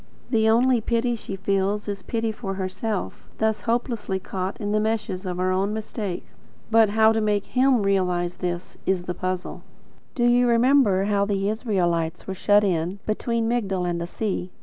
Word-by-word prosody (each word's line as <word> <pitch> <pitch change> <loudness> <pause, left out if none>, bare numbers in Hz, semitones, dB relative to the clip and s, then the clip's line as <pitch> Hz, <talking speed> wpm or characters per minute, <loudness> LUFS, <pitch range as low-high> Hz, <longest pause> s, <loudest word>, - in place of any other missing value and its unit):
The 220 -2 +3
only 240 +1 +4
pity 235 +2 0
she 205 -3 -6
feels 195 +2 -1
is 200 -1 -4
pity 225 -1 -2
for 200 -3 -5
herself, 190 +2 -4
thus 220 -1 0
hopelessly 230 -4 -1
caught 190 +1 -4
in 205 -2 -2
the 215 - +2
meshes 210 -3 -2
of 180 -1 -3
her 185 +1 +1
own 195 +3 0
mistake. 210 -4 -4 0.5
But 225 -1 +5
how 220 +1 +5
to 225 0 +1
make 210 -1 +1
him 255 -3 +2
realise 180 -3 +1
this, 175 -1 -4
is 190 -2 +1
the 180 - -3
puzzle. 185 +1 -4 0.5
Do 240 - 0
you 245 +1 +4
remember 235 -5 +4
how 200 0 +1
the 200 -1 0
Israelites 175 -7 -1
were 190 - -4
shut 205 +2 +3
in, 180 -1 0
between 230 +1 -1
Migdol 195 -6 0
and 170 -1 -2
the 170 - -3
sea? 190 -2 -3
205 Hz, 175 wpm, -24 LUFS, 185-225 Hz, 0.5 s, But